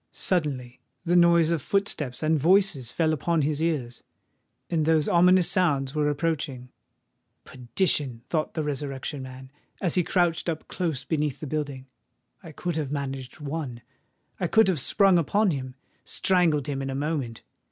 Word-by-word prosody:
Suddenly 140 Hz, -9 st, -1 dB, 0.3 s
the 175 Hz, +1 st, +2 dB
noise 170 Hz, -2 st, +5 dB
of 165 Hz, -4 st, 0 dB
footsteps 155 Hz, -8 st, -1 dB
and 155 Hz, +1 st, +3 dB
of -, -, -4 dB
voices 180 Hz, -, +3 dB
fell 160 Hz, -2 st, +1 dB
upon 160 Hz, +1 st, 0 dB
his 150 Hz, +1 st, -1 dB
ears; 140 Hz, -8 st, -2 dB, 0.7 s
and 165 Hz, -3 st, 0 dB
those 160 Hz, -2 st, +3 dB
ominous 180 Hz, 0 st, +5 dB
sounds 140 Hz, -7 st, +1 dB
were 150 Hz, -1 st, +1 dB
approaching. 145 Hz, -4 st, -2 dB, 0.7 s
"Perdition!" 130 Hz, -2 st, -2 dB
thought 155 Hz, -2 st, -2 dB
the 160 Hz, -, -1 dB
Resurrection 140 Hz, -1 st, -4 dB
Man, 130 Hz, 0 st, -10 dB, 0.3 s
as 175 Hz, -4 st, 0 dB
he 180 Hz, -, +2 dB
crouched 175 Hz, -1 st, +1 dB
up 160 Hz, -1 st, -4 dB
close 160 Hz, -8 st, -3 dB
beneath 150 Hz, -4 st, -1 dB
the -, -, -6 dB
building: 145 Hz, -3 st, -4 dB, 0.6 s
"I 165 Hz, -, -10 dB
could 170 Hz, +2 st, -4 dB
have 145 Hz, -3 st, -2 dB
managed 135 Hz, -2 st, -5 dB
one—I 140 Hz, +3 st, -7 dB
could 220 Hz, +5 st, +4 dB
have 175 Hz, -6 st, +1 dB
sprung 195 Hz, +5 st, +4 dB
upon 200 Hz, +5 st, +2 dB
him—strangled 145 Hz, +4 st, -1 dB
him 140 Hz, -2 st, -3 dB
in 135 Hz, -, -3 dB
a 135 Hz, -, -3 dB
moment. 140 Hz, -5 st, -3 dB
150 Hz, 150 wpm, -26 LUFS, 135-170 Hz, 0.7 s, noise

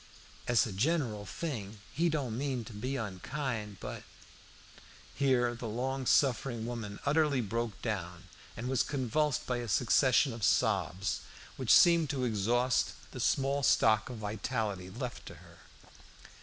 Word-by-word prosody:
Es 120 Hz, -1 st, +4 dB
a 110 Hz, -, -5 dB
gineral 115 Hz, -, 0 dB
thing 110 Hz, -, -5 dB, 0.2 s
he 170 Hz, +3 st, +2 dB
don't 140 Hz, -8 st, -2 dB
mean 130 Hz, -2 st, -2 dB
to 110 Hz, -, -10 dB
be 125 Hz, +6 st, -3 dB
unkind, 110 Hz, 0 st, -4 dB
but -, -, -6 dB, 0.6 s
" -, -, -21 dB, 0.3 s
Here 125 Hz, -3 st, +2 dB
the 120 Hz, 0 st, -6 dB
long 130 Hz, +4 st, -2 dB
suffering 120 Hz, -3 st, +2 dB
woman 115 Hz, -4 st, -5 dB
utterly 150 Hz, -1 st, +3 dB
broke 115 Hz, -1 st, -2 dB
down, 90 Hz, -6 st, -3 dB, 0.3 s
and 120 Hz, +3 st, -4 dB
was 130 Hz, -1 st, +2 dB
convulsed 140 Hz, +1 st, 0 dB
by 125 Hz, -, -1 dB
a 120 Hz, -1 st, -4 dB
succession 125 Hz, +3 st, +3 dB
of 115 Hz, -2 st, -7 dB
sobs, 95 Hz, 0 st, +1 dB, 0.3 s
which 130 Hz, -4 st, -5 dB
seemed 170 Hz, -, +6 dB
to 135 Hz, -4 st, -1 dB
exhaust 120 Hz, +3 st, 0 dB
the -, -, -8 dB
small 140 Hz, +1 st, +1 dB
stock 110 Hz, -5 st, +3 dB
of 125 Hz, -, -6 dB
vitality 105 Hz, -2 st, -3 dB
left -, -, -6 dB
to -, -, -9 dB
her. -, -, -17 dB
120 Hz, 145 wpm, -31 LUFS, 110-135 Hz, 0.6 s, seemed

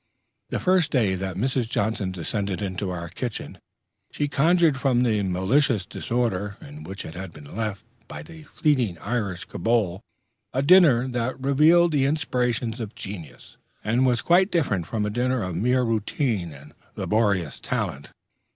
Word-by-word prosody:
The -, -, -2 dB
first 185 Hz, -3 st, +3 dB
day 110 Hz, -8 st, +2 dB
that 95 Hz, -1 st, -3 dB
Mrs. 125 Hz, +2 st, -1 dB
Johnson 100 Hz, -4 st, -1 dB
descended 95 Hz, +2 st, -3 dB
into 95 Hz, -1 st, -3 dB
our 85 Hz, -1 st, -4 dB
kitchen, 110 Hz, +7 st, -6 dB, 0.5 s
she 145 Hz, -, -1 dB
conjured 155 Hz, 0 st, +3 dB
from 125 Hz, -3 st, +3 dB
the 110 Hz, -4 st, +2 dB
malicious 100 Hz, +5 st, +1 dB
disorder 105 Hz, -5 st, -2 dB
in 150 Hz, 0 st, -11 dB
which 95 Hz, -6 st, -7 dB
it 80 Hz, -, -8 dB
had 95 Hz, 0 st, -7 dB
been 75 Hz, 0 st, -12 dB
left 110 Hz, -3 st, -3 dB, 0.2 s
by -, -, -8 dB
the 165 Hz, -2 st, -12 dB
flitting 130 Hz, -, 0 dB
Irish 100 Hz, -5 st, -3 dB
kobold 100 Hz, -3 st, 0 dB, 0.5 s
a 135 Hz, -, +1 dB
dinner 145 Hz, -7 st, +6 dB
that 125 Hz, +1 st, -2 dB
revealed 155 Hz, +6 st, +4 dB
the 140 Hz, -3 st, +2 dB
inspirations 125 Hz, -5 st, -1 dB
of 110 Hz, -3 st, -6 dB
genius, 95 Hz, -7 st, -9 dB, 0.3 s
and 115 Hz, +5 st, +2 dB
was 120 Hz, -2 st, +1 dB
quite 185 Hz, +3 st, +4 dB
different 105 Hz, -, 0 dB
from 110 Hz, -2 st, -1 dB
a 105 Hz, -, -2 dB
dinner 125 Hz, +1 st, 0 dB
of 90 Hz, -2 st, -4 dB
mere 125 Hz, +6 st, +2 dB
routine 110 Hz, -, -1 dB
and 75 Hz, +1 st, -13 dB, 0.2 s
laborious 100 Hz, -, 0 dB
talent. 70 Hz, +1 st, -3 dB
115 Hz, 155 wpm, -25 LUFS, 95-135 Hz, 0.5 s, dinner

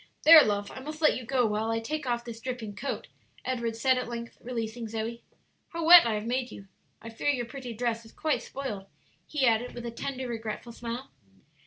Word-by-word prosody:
"There, 320 Hz, 0 st, +11 dB
love, 205 Hz, -1 st, -1 dB
I -, -, -8 dB
must 305 Hz, +3 st, -7 dB
let 310 Hz, -, +4 dB
you 255 Hz, -, -5 dB
go 250 Hz, 0 st, +2 dB
while 215 Hz, +1 st, 0 dB
I 225 Hz, 0 st, +1 dB
take 295 Hz, +5 st, -4 dB
off 240 Hz, -1 st, -1 dB
this 230 Hz, -1 st, -7 dB
dripping 245 Hz, -5 st, -5 dB
coat," 275 Hz, -, -4 dB, 0.4 s
Edward 235 Hz, -3 st, -1 dB
said, 255 Hz, +2 st, +3 dB
at 250 Hz, -, -4 dB
length, 235 Hz, 0 st, -6 dB
releasing 230 Hz, -1 st, -4 dB
Zoe. 225 Hz, +2 st, -4 dB, 0.5 s
"How 335 Hz, -1 st, -2 dB
wet 340 Hz, -5 st, +10 dB
I 220 Hz, -, +1 dB
have 210 Hz, +1 st, -3 dB
made 250 Hz, +1 st, -1 dB
you! 195 Hz, -, -11 dB, 0.4 s
I 230 Hz, -, -7 dB
fear 225 Hz, +6 st, -1 dB
your 250 Hz, -4 st, +1 dB
pretty 250 Hz, 0 st, -7 dB
dress 230 Hz, 0 st, -1 dB
is 225 Hz, -, -15 dB
quite 310 Hz, -2 st, 0 dB
spoiled," 210 Hz, -8 st, -6 dB, 0.4 s
he 295 Hz, -3 st, +1 dB
added, 235 Hz, +1 st, +2 dB
with 240 Hz, 0 st, -6 dB
a 235 Hz, -, -3 dB
tender, 260 Hz, +2 st, -4 dB
regretful 225 Hz, 0 st, -5 dB
smile. 235 Hz, +2 st, -6 dB
235 Hz, 210 wpm, -28 LUFS, 225-260 Hz, 0.5 s, There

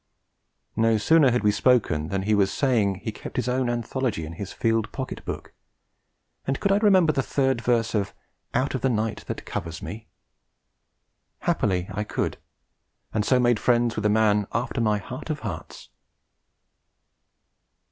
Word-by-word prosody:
No 115 Hz, 0 st, +3 dB
sooner 150 Hz, +5 st, +5 dB
had 125 Hz, -2 st, +1 dB
we 105 Hz, -, +4 dB
spoken 105 Hz, -9 st, +2 dB
than 95 Hz, +2 st, -2 dB
he 105 Hz, +2 st, +1 dB
was 100 Hz, -2 st, +3 dB
saying 110 Hz, -8 st, +2 dB
he 110 Hz, -, -2 dB
kept -, -, -9 dB
his 125 Hz, -2 st, -1 dB
own 125 Hz, 0 st, +1 dB
anthology 120 Hz, -5 st, -2 dB
in 80 Hz, -, -7 dB
his 95 Hz, +2 st, -6 dB
field 115 Hz, -1 st, 0 dB
pocket -, -, -5 dB
book -, -, -6 dB, 0.9 s
and 135 Hz, 0 st, 0 dB
could 200 Hz, -, +1 dB
I 200 Hz, -, +5 dB
remember 190 Hz, -7 st, +4 dB
the 135 Hz, -, +1 dB
third 135 Hz, -2 st, 0 dB
verse 115 Hz, -1 st, +1 dB
of 105 Hz, -3 st, 0 dB, 0.4 s
'Out 135 Hz, -, +1 dB
of 130 Hz, -, -2 dB
the 135 Hz, -, +2 dB
night 110 Hz, -2 st, -1 dB
that -, -, -5 dB
covers 85 Hz, -1 st, -5 dB
me'? 110 Hz, +1 st, -7 dB, 1.3 s
Happily 90 Hz, -2 st, 0 dB
I 105 Hz, -, -1 dB
could; -, -, -2 dB, 0.8 s
and 105 Hz, -, +1 dB
so 130 Hz, +3 st, +3 dB
made 120 Hz, -3 st, +3 dB
friends 120 Hz, -1 st, +2 dB
with 105 Hz, -1 st, +1 dB
a -, -, +2 dB
man 105 Hz, -1 st, +3 dB
after 120 Hz, 0 st, -1 dB
my 105 Hz, -2 st, +2 dB
heart 100 Hz, -, -8 dB
of -, -, -2 dB
hearts. -, -, -7 dB
115 Hz, 165 wpm, -25 LUFS, 105-125 Hz, 1.3 s, sooner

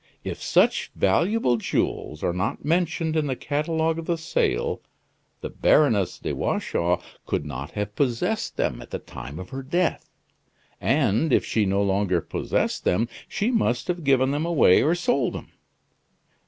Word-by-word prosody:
"If -, -, -5 dB
such -, -, +2 dB
valuable 125 Hz, -, +2 dB
jewels 75 Hz, -7 st, -2 dB
are 85 Hz, -, +1 dB
not 95 Hz, +8 st, -2 dB
mentioned 165 Hz, 0 st, 0 dB
in 155 Hz, -2 st, +1 dB
the 130 Hz, -, -1 dB
catalogue 160 Hz, +4 st, -1 dB
of 165 Hz, -, -7 dB
the 170 Hz, -, +1 dB
sale, 60 Hz, -, 0 dB, 0.6 s
the -, -, -4 dB
Baroness 105 Hz, -, +3 dB
de -, -, -4 dB
Watchau 85 Hz, +1 st, 0 dB, 0.3 s
could -, -, -1 dB
not 70 Hz, +4 st, -6 dB
have 105 Hz, 0 st, -3 dB
possessed 140 Hz, -, -1 dB
them -, -, -1 dB
at -, -, -11 dB
the -, -, -3 dB
time 70 Hz, +5 st, -9 dB
of 95 Hz, -, -8 dB
her 135 Hz, 0 st, -4 dB
death. 170 Hz, +6 st, -1 dB, 0.7 s
And 125 Hz, +10 st, +2 dB
if -, -, +3 dB
she 105 Hz, -3 st, +1 dB
no 100 Hz, +1 st, +2 dB
longer 95 Hz, -2 st, +1 dB
possessed -, -, -2 dB
them 115 Hz, +6 st, +1 dB, 0.2 s
she 215 Hz, +5 st, -1 dB
must 210 Hz, -, +1 dB
have 175 Hz, -2 st, -1 dB
given 135 Hz, -1 st, +3 dB
them 145 Hz, +2 st, -1 dB
away 160 Hz, -, +5 dB
or 160 Hz, +4 st, +3 dB
sold 140 Hz, -8 st, 0 dB
them. -, -, -8 dB
135 Hz, 160 wpm, -24 LUFS, 100-165 Hz, 0.7 s, away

